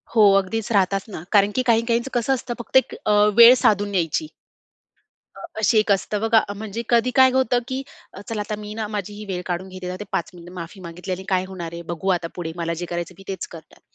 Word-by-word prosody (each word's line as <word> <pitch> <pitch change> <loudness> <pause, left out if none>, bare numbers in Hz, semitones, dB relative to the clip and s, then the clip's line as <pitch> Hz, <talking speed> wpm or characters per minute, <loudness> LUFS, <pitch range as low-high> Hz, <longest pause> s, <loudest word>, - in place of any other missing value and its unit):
हो, 220 - +6 0.2
अगदीच 215 +4 -2
राहतातच 195 0 +1
ना. 175 -6 -7
कारण 205 -1 +4
की 255 - +2
काही, 230 -2 +3
काहींच 235 +2 0
कसं 245 +2 +1
असतं. 245 -1 -3
फक्त 240 - +1
एक 260 - +2
अ, 215 - +2 0.3
वेळ 235 +1 +10
साधून 205 -1 +2
यायची. 175 - 0 1.3
असे 220 +1 +3
एक 215 0 +1
असतं 200 +1 -1
बघा, 225 0 +4 0.2
म्हणजे 220 +2 -5
कधी 235 +1 +3
काय 260 -1 +7
होतं, 260 -2 +2
की 260 0 -3 0.5
"चला 225 -2 -3
आता 210 +1 -3
मी 210 0 -7
ना 220 -1 -3
माझी 210 -1 -4
ही 210 +1 -8
वेळ 180 -2 -4
काढून 180 +1 -3
घेते, 185 -1 -6
ते - - -4
5 170 - -1
मिनिट 175 0 -12
माफी 180 +2 -8
मागितली 175 +1 -7
आणि 185 +1 -4
काय 185 -1 +1
होणार 175 -3 -7
आहे? 170 0 -7
बघू 170 +3 -4
आता 165 - -6
पुढे 165 -2 -4
मला 170 -1 -2
जे - - -3
करायचं 175 +1 -4
मी 195 - -13
तेच 190 -2 -4
करणार." 165 -2 -14
200 Hz, 225 wpm, -22 LUFS, 180-225 Hz, 1.3 s, वेळ